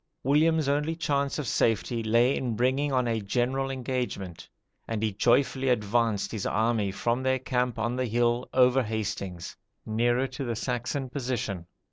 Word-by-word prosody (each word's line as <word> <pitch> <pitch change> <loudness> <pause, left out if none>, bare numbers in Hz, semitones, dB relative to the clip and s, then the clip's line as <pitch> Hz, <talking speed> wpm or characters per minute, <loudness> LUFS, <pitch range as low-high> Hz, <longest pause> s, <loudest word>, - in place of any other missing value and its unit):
William's 155 +2 +3
only 150 +3 0
chance 140 -4 0
of 150 - -3
safety 115 +1 +1
lay 115 +4 +3
in 120 -4 -2
bringing 130 +5 +1
on 125 -2 +1
a 115 -1 0
general 130 +6 0
engagement; 125 -9 -4 0.4
and 110 -1 -2
he 110 - +1
joyfully 130 +4 +2
advanced 115 -2 +1
his 110 -4 -3
army 110 -2 +1
from 120 +5 -1
their 130 0 +2
camp 125 -2 -1
on 120 +2 -1
the 130 0 0
hill 120 +2 +1
over 130 +1 +4
Hastings, 105 -6 -4 0.3
nearer 120 +4 +1
to 130 +1 -5
the 120 -3 -2
Saxon 125 +3 -2
position. 120 - -3
120 Hz, 155 wpm, -27 LUFS, 110-130 Hz, 0.4 s, over